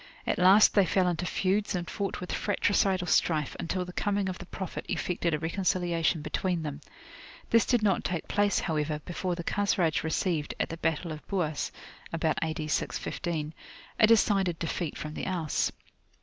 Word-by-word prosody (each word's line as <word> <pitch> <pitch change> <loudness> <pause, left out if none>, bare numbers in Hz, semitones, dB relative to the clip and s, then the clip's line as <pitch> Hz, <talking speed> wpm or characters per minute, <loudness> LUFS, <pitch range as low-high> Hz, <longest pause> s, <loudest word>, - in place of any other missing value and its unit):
At - - 0
last 190 +4 +7
they 200 -3 +4
fell 185 -2 +2
into 175 0 -1
feuds 200 +3 0
and 175 -1 -3
fought 200 -2 -3
with 180 - -6
fratricidal 195 -2 +1
strife, 155 -4 +1
until 180 +2 -2
the 180 - -9
coming 200 -1 0
of 185 - -5
the 175 - -9
Prophet 190 -1 -5
effected 175 -1 -1
a 155 - +1
reconciliation 170 -1 0
between 180 -1 -1
them. 150 -1 -5 0.7
This 230 -1 +5
did 245 -4 +2
not 200 -3 +2
take 175 -2 -3
place, 205 0 +2
however, 150 -2 -1
before 180 0 -2
the 170 - -5
Khazraj 185 -5 +1
received, 160 -1 -1
at - - 0
the 165 - -5
battle 165 +1 -1
of 155 -1 -7
Buas 165 -7 -1 0.4
(about 160 -1 0
A.D. 160 -1 -2
615), 155 0 -2 0.5
a 215 - +7
decided 195 -6 +3
defeat 165 -1 -3
from 150 0 -5
the - - -4
Aus. 170 -5 0
175 Hz, 170 wpm, -29 LUFS, 160-195 Hz, 0.7 s, last